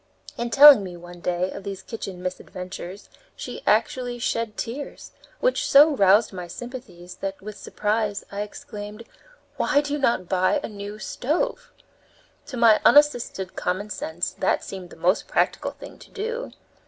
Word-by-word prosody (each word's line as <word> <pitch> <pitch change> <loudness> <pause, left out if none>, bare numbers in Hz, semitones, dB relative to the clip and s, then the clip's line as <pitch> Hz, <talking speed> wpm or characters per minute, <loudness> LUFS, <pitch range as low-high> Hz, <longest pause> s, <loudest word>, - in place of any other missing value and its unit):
In 235 0 -3
telling 280 -2 +9
me, 180 -2 -7
one 175 0 -12
day, 180 +1 -1
of - - -8
these 195 -1 -6
kitchen 190 -5 -7
misadventures, 185 +1 -7 0.3
she - - -7
actually 245 -2 +1
shed 230 -2 -2
tears, 270 +5 -6 0.3
which - - +2
so 295 +2 +7
roused 200 0 +4
my 180 -2 -6
sympathies 180 -5 -9
that, 195 0 -4
with 210 +1 -8
surprise, 210 -1 -2
I 200 0 -3
exclaimed: 210 +1 -8 0.5
"Why 285 - +3
do 290 0 -2
you 295 - -1
not 235 -9 +1
buy 185 +10 +2
a - - -3
new 205 0 -7
stove?" 285 +8 -2 0.8
To 255 - -6
my 230 -2 +6
unassisted 245 -10 +3
common 195 +4 -2
sense 165 -2 -3
that - - +1
seemed 185 -2 -8
the - - -13
most 180 +4 +1
practical - - 0
thing - - -12
to - - -15
do. 465 +4 -4
210 Hz, 155 wpm, -24 LUFS, 185-245 Hz, 0.8 s, telling